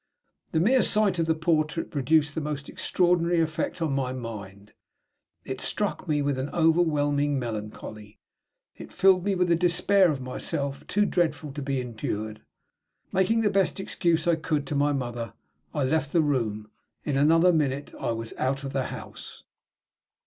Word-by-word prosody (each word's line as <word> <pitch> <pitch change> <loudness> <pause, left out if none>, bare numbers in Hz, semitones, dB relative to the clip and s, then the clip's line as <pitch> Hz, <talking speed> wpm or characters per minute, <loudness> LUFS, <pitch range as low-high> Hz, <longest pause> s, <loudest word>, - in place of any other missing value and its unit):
The 160 - +1
mere 245 +9 +4
sight 205 -4 +2
of 165 - +1
the 160 - +2
portrait 160 0 0
produced 145 +1 +2
the 160 - -2
most 145 -1 -4
extraordinary 175 -1 +1
effect 160 +1 -1
on 155 -4 0
my 135 -2 -1
mind. 105 -5 -8 0.7
It - - -5
struck - - -2
me 150 -2 +1
with 140 -2 0
an 135 +2 -3
overwhelming 145 -4 +2
melancholy; 105 -2 -6 0.6
it - - -11
filled 185 -2 +4
me 200 0 +1
with 180 -1 +1
a - - +6
despair 180 +2 +3
of 140 - -3
myself 140 +2 -4
too 205 0 +2
dreadful 160 -6 0
to 145 - -5
be 135 -1 -1
endured. 110 -3 -4 0.7
Making 215 +5 +2
the 210 -2 +2
best 195 -1 +1
excuse 170 -3 0
I 170 -2 +3
could 155 -2 -1
to 145 - -3
my 145 +1 +2
mother, 120 -5 -3 0.4
I 145 - -1
left 145 +2 0
the 170 - +5
room. 110 -7 -1 0.3
In 145 - -1
another 165 +5 +5
minute 145 -3 -1
I - - -2
was 115 0 -5
out 135 +2 0
of 135 - -5
the 135 -2 0
house. - - -9
150 Hz, 165 wpm, -26 LUFS, 130-170 Hz, 0.7 s, a